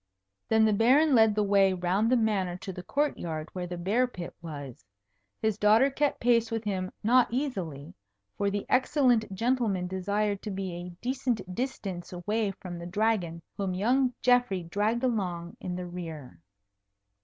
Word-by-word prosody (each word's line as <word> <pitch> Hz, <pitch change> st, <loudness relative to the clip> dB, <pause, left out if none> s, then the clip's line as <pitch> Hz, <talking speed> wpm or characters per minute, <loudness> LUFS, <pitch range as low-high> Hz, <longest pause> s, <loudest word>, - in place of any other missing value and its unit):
Then 220 Hz, 0 st, +5 dB
the 215 Hz, -, +3 dB
Baron 270 Hz, +8 st, +4 dB
led 220 Hz, -3 st, +5 dB
the 210 Hz, -, +2 dB
way 195 Hz, -1 st, +4 dB
round 185 Hz, +5 st, +1 dB
the 255 Hz, -, +5 dB
Manor 195 Hz, -6 st, 0 dB
to 190 Hz, +1 st, -7 dB
the 180 Hz, -, -7 dB
court 290 Hz, +10 st, -1 dB
yard 155 Hz, -2 st, -4 dB
where 180 Hz, -1 st, -4 dB
the 175 Hz, 0 st, -5 dB
bear 210 Hz, +9 st, +1 dB
pit 180 Hz, -8 st, -8 dB
was. 145 Hz, -9 st, -8 dB, 0.6 s
His 220 Hz, -1 st, +1 dB
daughter 220 Hz, +6 st, +5 dB
kept 290 Hz, +1 st, 0 dB
pace 235 Hz, -1 st, +3 dB
with 225 Hz, -1 st, -2 dB
him 185 Hz, -3 st, -2 dB
not 245 Hz, +3 st, +5 dB
easily, 190 Hz, -, -3 dB, 0.4 s
for 200 Hz, -, 0 dB
the 205 Hz, 0 st, -3 dB
excellent 255 Hz, -5 st, +2 dB
gentleman 220 Hz, -3 st, 0 dB
desired 200 Hz, +2 st, -1 dB
to 215 Hz, -, -5 dB
be 190 Hz, -2 st, -4 dB
a 175 Hz, +1 st, -6 dB
decent 245 Hz, -7 st, -2 dB
distance 195 Hz, -7 st, -4 dB
away 205 Hz, +4 st, -1 dB
from 180 Hz, -2 st, -7 dB
the 170 Hz, -, -7 dB
Dragon, 180 Hz, -4 st, 0 dB
whom 195 Hz, -2 st, -2 dB
young 250 Hz, +6 st, +2 dB
Geoffrey 245 Hz, -7 st, +3 dB
dragged 210 Hz, +8 st, -1 dB
along 180 Hz, -8 st, -2 dB
in 180 Hz, -1 st, -4 dB
the 180 Hz, 0 st, -4 dB
rear. 160 Hz, -, -8 dB
200 Hz, 165 wpm, -28 LUFS, 180-230 Hz, 0.6 s, Then